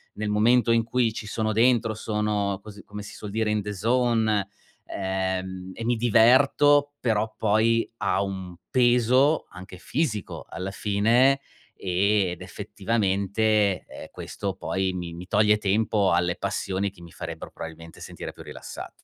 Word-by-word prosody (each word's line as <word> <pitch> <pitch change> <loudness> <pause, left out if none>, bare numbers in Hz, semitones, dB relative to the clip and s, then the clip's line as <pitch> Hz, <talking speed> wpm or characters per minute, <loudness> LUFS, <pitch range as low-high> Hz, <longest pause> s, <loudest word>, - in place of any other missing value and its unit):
nel 105 0 -3
momento 115 +3 +3
in 115 0 +3
cui 115 0 0
ci 110 - -6
sono 110 +1 -1
dentro, 115 0 +3
sono 105 -2 -1
così 105 0 -12
come 105 0 -8
si 105 - -10
suol 105 - -7
dire 110 0 0
in 105 0 +1
the 105 +1 -5
zone, 110 -1 +1 0.4
ehm, 95 -1 -3
e 115 - -6
mi 120 +1 +2
diverto, 135 +5 +4
però 110 -2 0
poi 110 +2 +2
ha - - 0
un 95 -3 -5
peso, 125 +4 +3
anche 90 0 -10
fisico 115 - -3
alla 95 +3 -5
fine, 115 +7 +3 0.4
e 95 +1 +1
ed 90 - -8
effettivamente, 100 0 0
ehm, - - -10
questo 100 -2 -5
poi 95 0 -1
mi 90 -2 -5
mi 90 +2 -9
toglie 105 +1 +4
tempo 105 -1 +1
alle 90 +1 +1
passioni 100 0 -2
che 95 -3 -18
mi 85 -1 -12
farebbero 80 -2 -7
probabilmente 80 0 -10
sentire - - -7
più - - -12
rilassato. - - -8
105 Hz, 150 wpm, -25 LUFS, 95-115 Hz, 0.4 s, diverto